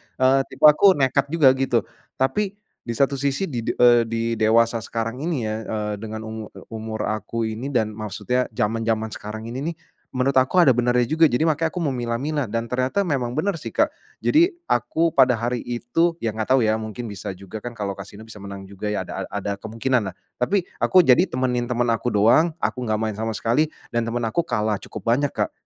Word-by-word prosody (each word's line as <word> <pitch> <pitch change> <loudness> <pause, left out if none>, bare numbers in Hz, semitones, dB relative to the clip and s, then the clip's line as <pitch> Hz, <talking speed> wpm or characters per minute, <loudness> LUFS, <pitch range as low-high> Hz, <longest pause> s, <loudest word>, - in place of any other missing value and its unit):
eee, 130 +1 +4
tipe - - -12
aku 165 +6 +7
nekat 140 0 +2
juga 150 -3 +5
gitu. 130 -4 +1 0.3
Tapi 200 +9 0 0.3
di 120 - -2
satu 140 +2 +1
sisi 140 +6 0
di 135 -10 -3
de - - 0
eee, 120 -1 +6
di 115 0 -2 0.2
dewasa 115 +1 +3
sekarang 115 +2 -4
ini 150 -5 -2
ya, 110 0 -2
eee, 105 -1 -2
dengan 110 0 -6
umur, 110 -1 -6
e - - -11
umur 110 -1 -4
aku 110 +2 -2
ini 110 +4 -3
dan 115 -6 0
maksudnya 110 +4 -2
zaman-zaman 110 0 0
sekarang 110 +2 -7
ini 125 - -4
nih, 170 - -3 0.4
menurut 130 +1 +1
aku 175 +8 +4
ada 140 - +6
benarnya 125 0 +2
juga 160 +6 +4
jadi 125 +3 0
makanya 160 0 +2
aku 180 +1 -4
memilah-milah 130 +1 -1
dan 115 +2 -2
ternyata 130 +10 +1
memang 130 -8 -1
benar 165 +2 -1
sih, - - -8
Kak. - - +3 0.3
Jadi, 335 +4 +5 0.2
aku 160 - +1
pada 125 -2 +5
hari 120 +2 -1
itu 120 +8 0
ya 115 - +1
gak 110 0 -3
tau - - +4
ya, 110 0 +3
mungkin 110 +2 -6
bisa 95 -1 -6
juga 100 +3 -8
kan 120 -1 -7
kalau 100 -1 -2
Kasino 100 +2 -10
bisa 110 -1 -12
menang 100 -1 -8
juga 100 +2 -7
ya 105 - -1
ada - - -5
ada 100 0 -4
kemungkinanlah, 110 -3 -1 0.3
tapi 190 +8 +2 0.2
aku 185 -1 +5
jadi 135 +9 +5
temenin 125 -1 -1
teman 120 0 +1
aku 115 - -3
doang, 120 +11 +4
aku 125 - -2
gak 110 0 +1
main 110 0 -2
sama 110 0 -1
sekali 145 +7 +1 0.3
dan 120 -1 0
teman 120 0 -2
aku 115 +10 +1
kalah 105 -3 0
cukup - - -9
banyak 140 +3 +2
Kak, - - -2
120 Hz, 205 wpm, -23 LUFS, 110-140 Hz, 0.4 s, aku